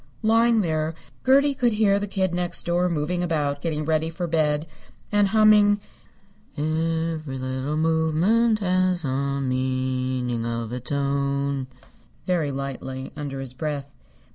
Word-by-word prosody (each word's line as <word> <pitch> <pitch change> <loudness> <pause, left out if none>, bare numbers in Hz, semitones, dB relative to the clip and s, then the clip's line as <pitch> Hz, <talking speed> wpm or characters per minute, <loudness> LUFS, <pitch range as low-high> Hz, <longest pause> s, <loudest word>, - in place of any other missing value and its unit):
Lying 225 +1 +4
there 160 -2 -1 0.3
Gertie 280 +2 +4
could 245 -3 +1
hear 205 -2 +3
the 205 - -3
Kid 190 -2 -1
Next 175 0 0
Door 175 +1 +1
moving 170 +2 -1
about 145 -5 -1
getting 155 -1 -2
ready 160 +1 +1
for 165 +2 -4
bed 155 -2 +1 0.5
and 205 -1 +4
humming 210 0 +5 0.8
"Every 160 -1 -1
Little 130 +3 -3
Movement 165 +9 +2
Has 185 -2 +1
a 140 +1 -1
Meaning 130 -2 -1
of 115 0 -3
Its 125 +1 -4
Own" 140 -1 -1 0.6
very 170 -5 0
lightly, 135 -1 -5
under 140 -2 -5
his 130 -2 -5
breath. 140 0 -4
155 Hz, 130 wpm, -24 LUFS, 140-180 Hz, 0.8 s, humming